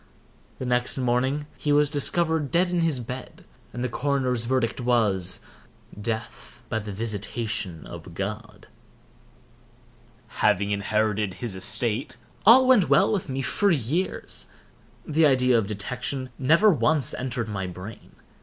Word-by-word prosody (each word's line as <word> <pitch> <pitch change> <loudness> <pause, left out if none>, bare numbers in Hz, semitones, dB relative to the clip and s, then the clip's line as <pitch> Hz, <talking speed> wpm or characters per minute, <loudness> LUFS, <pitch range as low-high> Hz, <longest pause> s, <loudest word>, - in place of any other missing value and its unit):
The 130 - -5
next 125 +1 +1
morning 130 +3 0
he 150 - -1
was 145 0 +3
discovered 160 0 +1
dead 175 +2 +2
in 175 -1 0
his 160 -6 +1
bed, 125 +2 -8 0.3
and 120 +2 -5
the - - 0
coroner's 125 -2 -1
verdict 125 -1 0
was—"Death 110 0 -2
by 110 - -1
the 105 -1 -7
visitation 105 - -1
of - - -10
God." - - -6 1.8
Having 100 +2 +2
inherited 105 -1 0
his 115 0 -5
estate, 110 +7 -1 0.3
all 255 +4 +8
went 245 -8 +5
well 195 +3 +4
with 190 -7 -2
me 135 0 -2
for 200 +8 +1
years. 160 - -2 0.6
The 155 0 +3
idea 130 -2 +3
of 110 -4 +2
detection 125 +5 -4
never 165 +11 +5
once 155 -3 +1
entered 125 -3 -3
my 95 -3 -4
brain. 90 +4 -10
125 Hz, 130 wpm, -25 LUFS, 110-145 Hz, 1.8 s, all